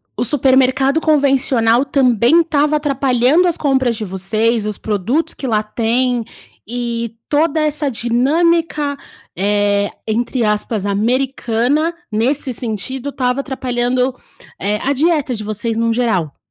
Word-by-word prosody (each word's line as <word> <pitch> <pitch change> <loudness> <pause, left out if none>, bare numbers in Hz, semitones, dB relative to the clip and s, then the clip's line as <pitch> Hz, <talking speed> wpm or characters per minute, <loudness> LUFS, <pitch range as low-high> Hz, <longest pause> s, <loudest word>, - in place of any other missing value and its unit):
o - - -1
supermercado 265 +2 +2
convencional 270 -5 +2
também 260 +3 +3
estava 305 -2 +1
atrapalhando 275 +2 +2
as 340 - 0
compras 265 -5 +1
de 215 - -5
vocês, 215 +4 -1
os 210 -1 -3
produtos 220 - -1
que 270 - -6
lá 215 -3 +1
tem 235 +2 0 0.5
e 235 -2 -3
toda 310 +1 +2
essa 300 -1 0
dinâmica, 290 +5 +1 0.4
eh, 205 +1 +1 0.2
entre 235 +2 -1
aspas 210 -1 -1
“americana”, 250 +7 0 0.2
nesse 255 +5 -1
sentido, 245 +4 -4
estava 255 -1 -1
atrapalhando, 255 -1 -1 0.5
eh, 210 +2 0
a 275 - +1
dieta 295 -3 +1
de 215 - -6
vocês, 215 +2 -3
num 230 0 +1
geral. 195 - -1
250 Hz, 125 wpm, -17 LUFS, 225-280 Hz, 0.5 s, também